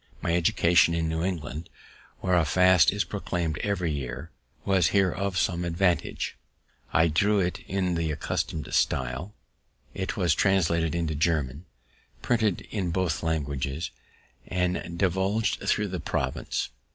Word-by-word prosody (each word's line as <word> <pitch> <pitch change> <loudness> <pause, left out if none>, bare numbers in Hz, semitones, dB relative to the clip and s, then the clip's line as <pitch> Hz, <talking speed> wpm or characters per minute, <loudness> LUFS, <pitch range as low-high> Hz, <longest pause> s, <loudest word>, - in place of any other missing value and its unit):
My 85 - 0
education 85 0 +4
in 80 -1 0
New 80 +1 -1
England, 80 -3 -4 0.5
where 90 - 0
a 85 - +4
fast 90 +2 +5
is 100 +1 0
proclaimed 85 -6 -3
every 90 -5 -1
year, 70 +3 -5 0.3
was 95 -4 +3
here 95 0 +3
of 100 0 -2
some 90 -1 +1
advantage: 85 +1 0 0.6
I 85 0 +4
drew 100 +6 +2
it 90 -1 -1
in 95 -1 0
the 85 -1 -1
accustomed 75 +1 -3
stile, 65 +10 0 0.6
it - - -3
was 85 -3 +3
translated 85 -3 +2
into 80 -2 -1
German, 75 -1 0 0.6
printed 110 -6 +1
in 95 -5 -1
both 85 -2 0
languages, 75 -1 -2 0.6
and 90 -1 0 0.2
divulg'd 95 +4 +1
thro' 105 - +2
the 95 -3 -4
province. 65 -3 -2
85 Hz, 135 wpm, -27 LUFS, 80-95 Hz, 0.6 s, fast